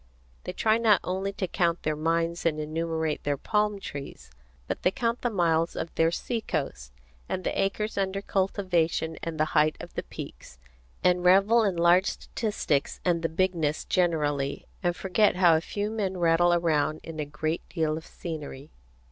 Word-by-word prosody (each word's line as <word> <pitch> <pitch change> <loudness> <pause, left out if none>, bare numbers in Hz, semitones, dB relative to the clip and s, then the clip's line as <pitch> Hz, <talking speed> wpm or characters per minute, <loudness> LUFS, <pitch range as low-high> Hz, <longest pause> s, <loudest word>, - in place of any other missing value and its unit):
They - - -3
try 220 +3 +2
not 220 -3 +5
only 190 +2 -2
to 190 - -2
count 170 -1 0
their 155 0 0
mines 165 +2 0
and 155 -2 +1
enumerate 160 0 -2
their 145 -1 0
palm 210 +5 0
trees, 140 - -8 0.3
but - - -4
they - - +4
count 230 +4 -1
the 245 - +1
miles 170 -5 +1
of 165 - -4
their 165 0 +3
sea 225 +7 -3
coast, - - -4 0.4
and 185 - -2
the - - 0
acres 200 +2 -1
under 195 0 -1
cultivation 180 -5 0
and 165 -2 -5
the 155 - +4
height 155 0 +4
of - - -9
the - - -2
peaks, 65 - -10 0.5
and 180 0 +3
revel 200 +6 +5
in 195 -4 +1
large 175 +3 +4
statistics 205 -10 -2
and 170 -2 +2
the 165 - 0
bigness 160 -3 0
generally, 145 -6 0 0.2
and 175 -2 0
forget 195 +3 +2
how 175 -3 +5
a 160 - +1
few 205 +5 -3
men 195 -4 -2
rattle 170 0 +4
around 155 -3 +1
in 160 -1 -8
a 150 - -1
great 155 +3 -2
deal 160 -3 0
of 160 - -8
scenery. 150 -4 -7
170 Hz, 175 wpm, -27 LUFS, 155-190 Hz, 0.5 s, not